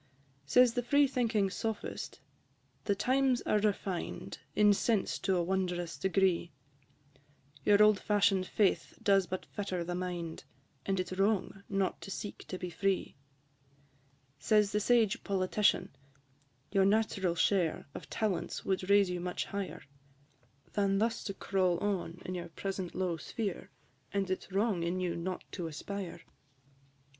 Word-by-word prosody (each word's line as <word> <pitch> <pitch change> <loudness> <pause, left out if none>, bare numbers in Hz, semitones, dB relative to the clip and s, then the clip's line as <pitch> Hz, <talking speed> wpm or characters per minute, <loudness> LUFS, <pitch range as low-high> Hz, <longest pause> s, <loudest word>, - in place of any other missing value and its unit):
Says 250 - +6
the 245 - 0
free 285 +4 +4
thinking 230 -7 +1
Sophist, 220 +1 -4 0.6
"The 200 - +2
times 260 +3 +2
are 210 - +2
refined 200 -3 -2 0.2
In 210 -1 +6
sense 210 0 0
to 190 - +1
a 175 - +1
wondrous 175 -2 -1
degree; 190 -3 +1 1.1
Your 205 0 +6
old 210 -2 +5
fashion'd 195 -3 +2
faith 205 -3 +1
does 195 -2 +4
but 185 +2 -4
fetter 190 -4 -3
the 175 +1 -4
mind, 175 -2 -4 0.4
And 195 -1 +1
it 180 -1 -2
's 185 - -6
wrong 195 -1 +1
not 195 -1 0
to - - -8
seek 205 +1 -6
to 185 - -4
be 180 -1 -5
free." 195 +3 -1 1.2
Says 210 +5 +3
the 210 - +1
sage 225 -2 +3
Politician, 195 +1 +1 0.8
"Your 195 -1 +4
natural 200 -4 +2
share 175 -1 +1
Of - - -9
talents 205 -6 -2
would 190 0 -1
raise 200 -2 +5
you 180 - -2
much 180 0 -3
higher, 200 -1 -5 0.9
Than 195 -1 +2
thus 225 +2 0
to 195 - -3
crawl 185 -3 +1
on 185 -3 -2
in 185 - -4
your 175 -1 -5
present 190 +1 -4
low 180 -3 -1
sphere, 195 0 -4 0.4
And 195 -1 -1
it 185 - -1
's - - -15
wrong 200 -2 +1
in 170 +2 -1
you 180 -2 -1
not 180 +2 -4
to 175 -4 -4
aspire." 180 +3 -6
III. - - -24
195 Hz, 150 wpm, -32 LUFS, 180-210 Hz, 1.2 s, Says